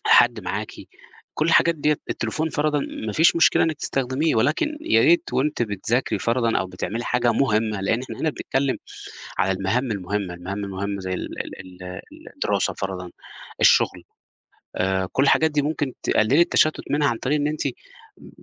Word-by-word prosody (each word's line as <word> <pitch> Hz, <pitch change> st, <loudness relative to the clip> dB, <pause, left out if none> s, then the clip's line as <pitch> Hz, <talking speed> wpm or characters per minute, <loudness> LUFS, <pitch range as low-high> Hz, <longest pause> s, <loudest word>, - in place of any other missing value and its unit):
حد -, -, +5 dB
معاكِ -, -, -4 dB, 0.6 s
كلّ 155 Hz, -, 0 dB
الحاجات 170 Hz, 0 st, +4 dB
ديّة 150 Hz, 0 st, +1 dB
التليفون 160 Hz, +1 st, -2 dB
فَرَضًا 150 Hz, -1 st, 0 dB
ما 110 Hz, -5 st, -5 dB
فيش 165 Hz, +5 st, +4 dB
مشكلة 165 Hz, -, +5 dB
إنِك 160 Hz, -2 st, -1 dB
تستخدميه، 135 Hz, +2 st, -1 dB
ولكن 155 Hz, -, +1 dB
يا 330 Hz, -, +3 dB
ريت 340 Hz, 0 st, +3 dB
وأنتِ 140 Hz, -2 st, 0 dB
بتذاكري 110 Hz, +4 st, -1 dB
فَرَضًا 115 Hz, -1 st, +1 dB
أو 95 Hz, -, -2 dB
بتعملي 100 Hz, +6 st, -4 dB
حاجة 120 Hz, -1 st, +1 dB
مهمّة، 110 Hz, -4 st, +1 dB
لإن 115 Hz, +5 st, 0 dB
إحنا 130 Hz, -, -8 dB
هنا 160 Hz, -, +1 dB
بنتكلّم 135 Hz, -1 st, -1 dB, 0.6 s
على 95 Hz, -, +2 dB
المهام 110 Hz, +7 st, -1 dB
المهمّة، 100 Hz, -1 st, -3 dB
المهام 95 Hz, +4 st, -5 dB
المهمّة 100 Hz, +1 st, -4 dB
زي 95 Hz, 0 st, -3 dB
ال -, -, -4 dB, 0.2 s
ال 90 Hz, -1 st, -11 dB, 0.3 s
ال -, -, -13 dB
الدراسة -, -, 0 dB
فَرَضًا، 90 Hz, -2 st, -5 dB, 0.5 s
الشغل، -, -, +4 dB, 0.7 s
آآ 95 Hz, 0 st, 0 dB
كلّ 135 Hz, -, +2 dB
الحاجات 160 Hz, +3 st, +4 dB
دي 150 Hz, -1 st, +1 dB
ممكن 145 Hz, -3 st, -2 dB
تقلّلي 125 Hz, +9 st, +3 dB
التشتُّت 155 Hz, -2 st, +2 dB
منها 145 Hz, -1 st, +2 dB
عن 115 Hz, -2 st, -1 dB
طريق 145 Hz, +4 st, 0 dB
إن 145 Hz, -, 0 dB
أنتِ 155 Hz, 0 st, -4 dB, 0.6 s
م -, -, -14 dB
125 Hz, 165 wpm, -23 LUFS, 100-150 Hz, 0.7 s, حد